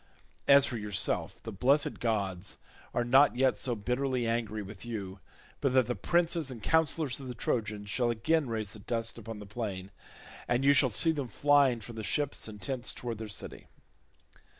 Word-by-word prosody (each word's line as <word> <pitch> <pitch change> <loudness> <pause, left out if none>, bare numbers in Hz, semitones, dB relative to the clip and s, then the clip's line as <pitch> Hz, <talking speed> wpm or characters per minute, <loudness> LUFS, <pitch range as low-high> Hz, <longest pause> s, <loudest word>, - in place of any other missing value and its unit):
As 140 0 +8
for 125 -4 -3
yourself, 105 -2 -2
the 115 - -5
blessed 135 +9 +2
gods 100 -5 -2 0.3
are 120 - 0
not 130 +3 +5
yet 130 +1 +3
so 125 -2 -1
bitterly 125 +3 -1
angry 115 -2 -1
with 100 0 -10
you 100 -5 -6 0.4
but 135 -2 +1
that 130 -2 +5
the 120 - -1
princes 170 -3 +1
and 115 -5 -8
counsellors 160 -4 +1
of 135 - -8
the 125 - -6
Trojans 105 -3 -2
shall 120 +3 +1
again 125 +5 +1
raise 110 -2 -3
the 105 - -10
dust 115 +2 -2
upon 115 0 -7
the 105 - -9
plain, 100 -3 -5 0.6
and 120 +2 +1
you 140 - +7
shall 140 -2 +4
see 160 +9 +4
them 145 -5 -3
flying 140 -1 +3
from 115 +2 -9
the 110 - -4
ships 145 +4 -1
and 105 -1 -9
tents 130 0 -2
towards 115 -3 -5
their 110 - -5
city." 105 - -7
120 Hz, 185 wpm, -30 LUFS, 105-135 Hz, 0.6 s, As